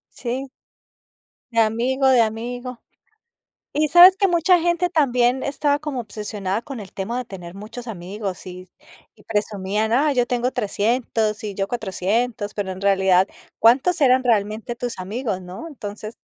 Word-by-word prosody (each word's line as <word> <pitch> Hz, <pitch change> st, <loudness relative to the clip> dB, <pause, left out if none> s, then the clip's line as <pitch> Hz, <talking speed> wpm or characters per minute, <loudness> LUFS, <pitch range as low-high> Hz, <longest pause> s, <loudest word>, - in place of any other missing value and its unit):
Sí. 260 Hz, +3 st, -4 dB, 1.0 s
De 230 Hz, -, +3 dB
amigo, 240 Hz, +5 st, +1 dB
de 255 Hz, -2 st, +5 dB
amigo. 240 Hz, +3 st, -3 dB, 0.9 s
Y, 305 Hz, +1 st, +1 dB
¿sabes?, 355 Hz, +5 st, +8 dB
que 395 Hz, -, +3 dB
mucha 350 Hz, 0 st, +4 dB
gente 345 Hz, +1 st, +1 dB
también, 255 Hz, -6 st, +2 dB
estaba 285 Hz, +1 st, 0 dB
como 295 Hz, -4 st, -4 dB
obsesionada, 210 Hz, -2 st, -4 dB
con 270 Hz, -1 st, -8 dB
el 195 Hz, -, -11 dB
tema 200 Hz, +5 st, -3 dB
de 250 Hz, -, -2 dB
tener 180 Hz, -4 st, -10 dB
muchos 225 Hz, +5 st, -9 dB
amigos, 195 Hz, -1 st, -6 dB
y 185 Hz, 0 st, -10 dB, 0.5 s
y -, -, -21 dB
presumían: 210 Hz, 0 st, -1 dB
"Ah, 290 Hz, +5 st, +3 dB
yo 250 Hz, -3 st, +2 dB
tengo 245 Hz, +1 st, 0 dB
300. 220 Hz, -1 st, -1 dB
Y 205 Hz, -2 st, -5 dB
yo 195 Hz, 0 st, -1 dB
400". 220 Hz, +1 st, -2 dB
Pero 200 Hz, -2 st, -3 dB
en 185 Hz, +1 st, -8 dB
realidad, 190 Hz, -1 st, +3 dB, 0.3 s
¿cuántos 260 Hz, +10 st, +4 dB
eran 260 Hz, -1 st, +5 dB
realmente 215 Hz, 0 st, 0 dB
tus 240 Hz, -4 st, -5 dB
amigos, 205 Hz, +1 st, -3 dB
no? 180 Hz, -, -9 dB
Entonces 215 Hz, -5 st, -8 dB
230 Hz, 150 wpm, -22 LUFS, 200-260 Hz, 1.0 s, sabes